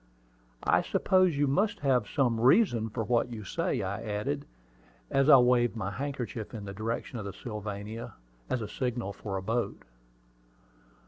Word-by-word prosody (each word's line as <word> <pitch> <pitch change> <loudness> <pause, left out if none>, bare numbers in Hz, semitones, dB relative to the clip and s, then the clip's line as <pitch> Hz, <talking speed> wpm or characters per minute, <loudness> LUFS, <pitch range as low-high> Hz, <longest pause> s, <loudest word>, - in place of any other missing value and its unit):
"I - - +4
suppose 185 -5 +2
you 145 - +3
must 195 +10 +1
have 130 -6 +2
some 125 -6 +1
reason 120 - +4
for 115 +1 -3
what 120 +3 +1
you 110 -2 -6
say," 95 - -1
I 100 +3 -3
added, 115 +7 -3 0.6
as 135 +2 +3
I 140 - +10
waved 125 -1 +3
my 100 -3 -3
handkerchief 120 -2 -4
in 105 -2 -6
the 100 - -6
direction 115 +3 -3
of 105 - -6
the 100 - -5
Sylvania, 105 +1 -6 0.3
as 120 - -1
a - - -4
signal 120 -4 -3
for 100 -1 -5
a 95 - -5
boat. 115 +4 -2
115 Hz, 165 wpm, -29 LUFS, 105-135 Hz, 0.6 s, I